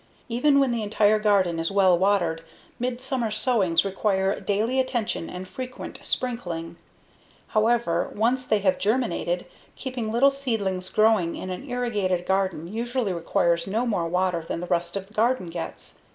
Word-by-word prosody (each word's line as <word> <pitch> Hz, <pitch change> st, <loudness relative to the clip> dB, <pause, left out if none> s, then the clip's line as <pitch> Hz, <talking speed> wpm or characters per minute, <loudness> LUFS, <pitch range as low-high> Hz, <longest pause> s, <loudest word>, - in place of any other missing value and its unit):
Even 280 Hz, +4 st, +3 dB
when 270 Hz, -2 st, +3 dB
the 235 Hz, -1 st, -1 dB
entire 215 Hz, 0 st, +3 dB
garden 195 Hz, -5 st, +2 dB
is 165 Hz, -, 0 dB
well 190 Hz, -2 st, +5 dB
watered, 175 Hz, -3 st, +1 dB, 0.4 s
midsummer 250 Hz, -1 st, -2 dB
sowings 210 Hz, -6 st, +2 dB
require 195 Hz, 0 st, 0 dB
daily 220 Hz, +6 st, 0 dB
attention 240 Hz, -9 st, -1 dB
and 180 Hz, +1 st, -7 dB
frequent 255 Hz, +5 st, -7 dB
sprinkling; 175 Hz, -10 st, -3 dB, 0.7 s
however, 215 Hz, -6 st, +1 dB
once 250 Hz, +4 st, +1 dB
they 215 Hz, -, +3 dB
have 185 Hz, -2 st, +2 dB
germinated, 205 Hz, -5 st, 0 dB, 0.3 s
keeping 250 Hz, -5 st, -4 dB
little 265 Hz, +5 st, +5 dB
seedlings 205 Hz, -9 st, -2 dB
growing 215 Hz, -6 st, +3 dB
in 185 Hz, -, -5 dB
an 260 Hz, +10 st, -6 dB
irrigated 205 Hz, -8 st, -1 dB
garden 190 Hz, -4 st, 0 dB
usually 230 Hz, +1 st, -2 dB
requires 170 Hz, 0 st, +1 dB
no 220 Hz, +5 st, 0 dB
more 195 Hz, -8 st, 0 dB
water 180 Hz, 0 st, 0 dB
than -, -, -3 dB
the 175 Hz, -, -4 dB
rest 170 Hz, 0 st, -1 dB
of 195 Hz, -1 st, -3 dB
the 210 Hz, -, -21 dB
garden 220 Hz, -5 st, +1 dB
gets. 165 Hz, -1 st, -7 dB
205 Hz, 150 wpm, -25 LUFS, 180-240 Hz, 0.7 s, well